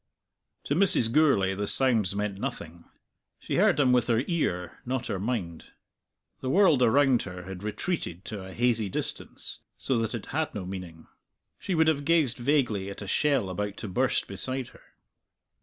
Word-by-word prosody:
To -, -, -1 dB
Mrs. 160 Hz, -, +4 dB
Gourlay 125 Hz, -10 st, +3 dB
the 100 Hz, +1 st, -3 dB
sounds 110 Hz, -8 st, +4 dB
meant 100 Hz, -1 st, -3 dB
nothing; 85 Hz, -, -6 dB, 0.5 s
she -, -, -3 dB
heard -, -, +4 dB
them 135 Hz, -4 st, +4 dB
with 125 Hz, -1 st, +3 dB
her 120 Hz, 0 st, +2 dB
ear, 90 Hz, -, -2 dB
not 130 Hz, 0 st, -3 dB
her 95 Hz, -, -3 dB
mind. 95 Hz, -7 st, -4 dB, 0.7 s
The 130 Hz, -, -4 dB
world 165 Hz, -5 st, +4 dB
around 130 Hz, +1 st, +4 dB
her 90 Hz, -1 st, -7 dB
had 95 Hz, 0 st, -8 dB
retreated 105 Hz, -, -4 dB
to 105 Hz, -3 st, -6 dB
a 95 Hz, -, -9 dB
hazy 115 Hz, -2 st, +1 dB
distance, -, -, -5 dB, 0.2 s
so 130 Hz, -3 st, 0 dB
that 115 Hz, 0 st, -2 dB
it 115 Hz, -, -6 dB
had 160 Hz, +1 st, -1 dB
no 100 Hz, -3 st, -4 dB
meaning. 90 Hz, -3 st, -8 dB, 0.5 s
She 185 Hz, -, -2 dB
would 160 Hz, 0 st, +3 dB
have 150 Hz, -3 st, +2 dB
gazed 150 Hz, -6 st, +2 dB
vaguely 120 Hz, -7 st, +1 dB
at 100 Hz, -, -8 dB
a -, -, -8 dB
shell 140 Hz, -3 st, +1 dB
about 100 Hz, +2 st, -4 dB
to -, -, -6 dB
burst 125 Hz, +7 st, 0 dB
beside 130 Hz, -1 st, -4 dB
her. -, -, -19 dB
115 Hz, 175 wpm, -27 LUFS, 95-135 Hz, 0.7 s, Mrs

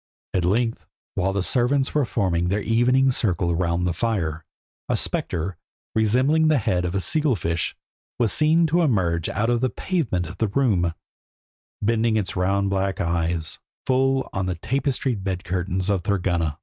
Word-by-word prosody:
At 90 Hz, -2 st, +1 dB
length, 115 Hz, +5 st, 0 dB, 0.3 s
while 95 Hz, +1 st, 0 dB
the 100 Hz, -1 st, -1 dB
servants 130 Hz, +5 st, +1 dB
were 150 Hz, -3 st, +2 dB
forming 90 Hz, -7 st, 0 dB
their 100 Hz, +3 st, 0 dB
evening 125 Hz, +4 st, +3 dB
circle 90 Hz, -8 st, +1 dB
round 85 Hz, 0 st, 0 dB
the 90 Hz, -, 0 dB
fire, 85 Hz, -6 st, -1 dB, 0.5 s
a -, -, +2 dB
spectre, 85 Hz, +1 st, -2 dB, 0.4 s
resembling 130 Hz, +9 st, +3 dB
the 155 Hz, -1 st, +4 dB
head 90 Hz, -6 st, 0 dB
of 90 Hz, +2 st, -2 dB
a -, -, +2 dB
seal 150 Hz, +5 st, +1 dB
fish, 85 Hz, -3 st, -2 dB, 0.4 s
was 115 Hz, -4 st, +2 dB
seen 160 Hz, +2 st, +4 dB
to 165 Hz, +3 st, +2 dB
emerge 90 Hz, -, +1 dB
out 115 Hz, +4 st, 0 dB
of 120 Hz, -1 st, +1 dB
the 130 Hz, -, +2 dB
pavement 125 Hz, -, -1 dB
of 90 Hz, +5 st, -9 dB
the 110 Hz, -, +2 dB
room, 100 Hz, -8 st, +1 dB, 0.9 s
bending 115 Hz, +1 st, +2 dB
its 100 Hz, -3 st, -2 dB
round 100 Hz, +2 st, +1 dB
black 95 Hz, 0 st, -1 dB
eyes 85 Hz, -2 st, -1 dB, 0.3 s
full 135 Hz, +1 st, +2 dB
on 95 Hz, -1 st, -1 dB
the 90 Hz, -, -1 dB
tapestried 130 Hz, -, -1 dB
bed 95 Hz, -2 st, -3 dB
curtains 90 Hz, +1 st, -2 dB
of 100 Hz, -3 st, +1 dB
Thorgunna. 85 Hz, -5 st, 0 dB
100 Hz, 165 wpm, -23 LUFS, 90-125 Hz, 0.9 s, the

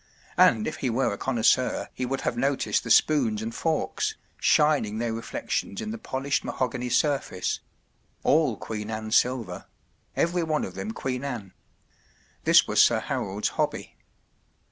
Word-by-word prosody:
And 110 Hz, -3 st, +5 dB
if 155 Hz, -, -3 dB
he 130 Hz, -, -1 dB
were 120 Hz, -1 st, +1 dB
a -, -, -5 dB
connoisseur 125 Hz, 0 st, +1 dB
he 125 Hz, -, -3 dB
would 135 Hz, +1 st, -2 dB
have -, -, -1 dB
noticed 135 Hz, +3 st, 0 dB
the -, -, -6 dB
spoons 125 Hz, -9 st, +4 dB
and 115 Hz, +1 st, -4 dB
forks, 165 Hz, -, -1 dB, 0.2 s
shining 150 Hz, -9 st, +3 dB
their 115 Hz, 0 st, -1 dB
reflections 110 Hz, -3 st, -3 dB
in 215 Hz, -, -4 dB
the 225 Hz, -, -6 dB
polished 135 Hz, -6 st, -2 dB
mahogany 125 Hz, -1 st, -2 dB
surface—all 140 Hz, -, -1 dB
Queen 105 Hz, -1 st, -5 dB
Anne 110 Hz, 0 st, -4 dB
silver— 120 Hz, -7 st, +1 dB, 0.5 s
every 175 Hz, +1 st, +1 dB
one 155 Hz, -2 st, 0 dB
of -, -, -8 dB
them -, -, -5 dB
Queen 130 Hz, -, -3 dB
Anne. 120 Hz, -9 st, -5 dB, 0.9 s
This -, -, +6 dB
was -, -, +5 dB
Sir -, -, +4 dB
Harold’rvhobb^Y. 100 Hz, +2 st, -2 dB
125 Hz, 145 wpm, -26 LUFS, 110-145 Hz, 0.9 s, This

